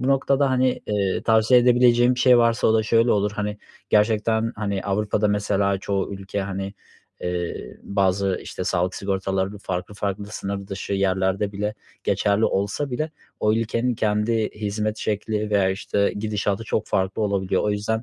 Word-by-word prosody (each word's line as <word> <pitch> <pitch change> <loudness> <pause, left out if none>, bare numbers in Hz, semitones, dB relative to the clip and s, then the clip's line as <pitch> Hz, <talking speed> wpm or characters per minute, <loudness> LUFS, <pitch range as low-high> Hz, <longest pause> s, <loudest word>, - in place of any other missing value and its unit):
Bu 130 - -1
noktada, 135 0 +2
hani, 130 0 +1
eee, 100 -2 0
tavsiye 115 +2 +5
edebileceğim 125 0 +4
bir - - -2
şey 125 -2 +6
varsa 115 -1 +3
o 110 - +3
da 110 - +3
şöyle 115 +2 +3
olur, 105 0 +1
hani, 105 0 -3 0.3
gerçekten, 110 +1 +2
hani, 100 -2 -2
Avrupa'da 105 +1 0
mesela 100 -1 +1
çoğu 100 0 -2
ülke, 100 +1 -4
hani, 100 +1 -4 0.5
eee, 90 -1 -4
bazı, 95 -1 +1
işte, 90 - -6
sağlık 90 +1 0
sigortaları 95 0 -2
farklı 90 +1 -4
farklı 100 0 -3
sınır 100 -2 -5
dışı 100 +1 -5
yerlerde 95 +1 0
bile 105 +1 -2 0.3
geçerli 100 +1 +2
olsa 100 +9 -1
bile 155 +5 -2 0.3
o 105 - +3
ülkenin 115 +2 0
kendi 105 +1 0
hizmet 105 +1 -2
şekli 105 0 -2
veya, 100 -2 +3
işte, 100 +1 0
gidişatı 105 0 -1
çok 110 -1 -1
farklı 95 +3 0
olabiliyor. 100 -2 0
O 105 - +1
yüzden, 105 +2 -1
105 Hz, 160 wpm, -23 LUFS, 100-110 Hz, 0.5 s, şey